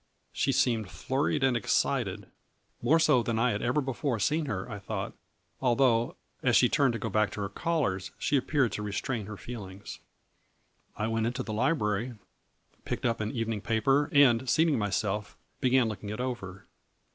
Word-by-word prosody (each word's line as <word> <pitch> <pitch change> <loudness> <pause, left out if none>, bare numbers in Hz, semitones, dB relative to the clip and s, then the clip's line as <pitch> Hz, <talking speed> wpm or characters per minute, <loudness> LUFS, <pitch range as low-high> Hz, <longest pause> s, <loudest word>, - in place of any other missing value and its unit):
She 135 - +1
seemed 120 -6 +1
flurried 135 +5 -1
and 130 -2 +3
excited, 110 -3 0 0.6
more 160 - +4
so 150 -6 +4
than 115 0 -1
I 120 +2 +3
had 105 - -2
ever 125 +5 +1
before 135 -1 -2
seen 150 +9 0
her, 95 -6 -3
I 105 -4 -6
thought, 100 - -4 0.5
although, 120 -2 +2 0.3
as - - +3
she - - +6
turned 135 -4 +2
to - - -2
go 115 - -4
back 105 0 +2
to 105 - -5
her 100 - -2
callers, 115 - -1
she 145 - 0
appeared 135 -2 +2
to - - -4
restrain 105 +2 -3
her 105 -1 -7
feelings. 100 -3 -8 1.0
I 110 - -1
went 110 0 0
into 125 +2 -2
the 110 - -5
library, 115 -2 0 0.7
picked - - -4
up 115 -2 +1
an 110 0 -2
evening 115 -3 -2
paper 135 +7 +2
and 130 -3 +5
seating 155 -3 +3
myself 105 0 -2 0.2
began 130 -2 +3
looking 105 -1 -5
it 105 - -5
over. 100 -7 -5
115 Hz, 170 wpm, -29 LUFS, 105-130 Hz, 1.0 s, she